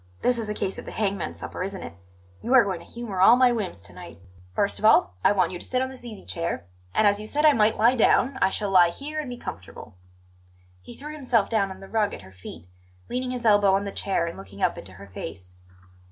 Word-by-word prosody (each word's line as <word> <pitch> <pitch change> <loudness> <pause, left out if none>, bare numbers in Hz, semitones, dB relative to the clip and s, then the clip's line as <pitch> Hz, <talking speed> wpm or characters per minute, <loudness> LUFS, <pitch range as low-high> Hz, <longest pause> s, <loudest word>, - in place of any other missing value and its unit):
This 245 -1 +2
is 220 -2 -4
a 210 - -3
case 195 - -3
of - - -9
the - - -7
hangman's 195 - -2
supper, 95 - -7
isn't 195 +1 -4
it? - - -8 0.5
You 250 +3 +1
are 250 - +8
going 190 -4 -3
to - - -14
humour 225 -6 -5
all 225 +5 +8
my 250 0 +5
whims 200 - -4
to 90 - -15
night. 85 -2 -11 0.4
First 200 - 0
of - - -2
all, 155 - +5
I - - +5
want 185 -4 +1
you 180 - -6
to - - -9
sit 255 - -1
on 260 0 -1
this 260 -2 -11
easy 225 -4 -9
chair, 165 - -3 0.3
and, 215 - +4
as 205 0 +4
you 215 - -7
said 300 +6 0
I 300 - +7
might 220 -1 +2
lie 235 +4 +4
down, 260 +3 +3
I - - +4
shall 200 0 -2
lie 180 -2 +6
here 295 - -6
and 295 -4 -4
be 245 - -6
comfortable." 100 - -9 0.9
He 240 - -11
threw 300 +4 -8
himself 250 -8 +1
down 205 -4 +1
on 190 0 -10
the 195 - -10
rug 215 -1 0
at 100 - -12
her 95 0 -15
feet, 90 -2 -11 0.4
leaning 255 +1 -2
his 250 -1 -4
elbow 205 -3 +5
on 195 - 0
the 200 - -5
chair 190 -4 -1
and 170 - -6
looking 100 0 -9
up - - +2
into 95 -2 -11
her 100 +2 -12
face. 90 -1 -9
205 Hz, 255 wpm, -25 LUFS, 170-240 Hz, 0.9 s, are